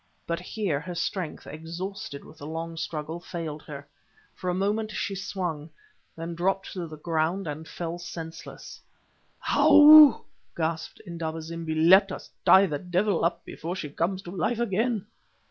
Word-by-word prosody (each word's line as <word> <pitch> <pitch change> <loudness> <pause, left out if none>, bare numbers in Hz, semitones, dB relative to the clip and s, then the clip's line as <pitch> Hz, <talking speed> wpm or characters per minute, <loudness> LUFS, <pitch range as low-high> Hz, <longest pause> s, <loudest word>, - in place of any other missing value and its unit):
But 170 0 -2
here 180 -4 -2
her 175 +3 -7
strength, 170 -1 -3
exhausted 165 0 -7
with 155 - -15
the 145 - -8
long 165 +1 -5
struggle, 160 0 -4
failed 165 -4 -6
her. 140 -1 -8 0.5
For 185 - -4
a - - +1
moment 210 +3 0
she 200 - -3
swung, 180 -6 -4 0.5
then 165 +1 -5
dropped 190 +3 -1
to 180 -3 -4
the 155 -1 -10
ground 165 +4 -1
and 155 +1 -6
fell 170 0 -5
senseless. 165 -2 -9 0.7
"Ou!" 300 -1 +9 0.3
gasped 160 -1 -3
Indaba 165 -2 -4
zimbi. 165 -1 -4
"Let 190 +5 +6
us - - -8
tie 190 +1 +7
the 150 -6 -3
devil 180 +2 0
up 170 0 0
before 170 +3 -5
she 155 -6 -5
comes 185 +5 -2
to 175 - -8
life 195 +6 -1
again." 225 -1 0
170 Hz, 155 wpm, -27 LUFS, 160-195 Hz, 0.7 s, Ou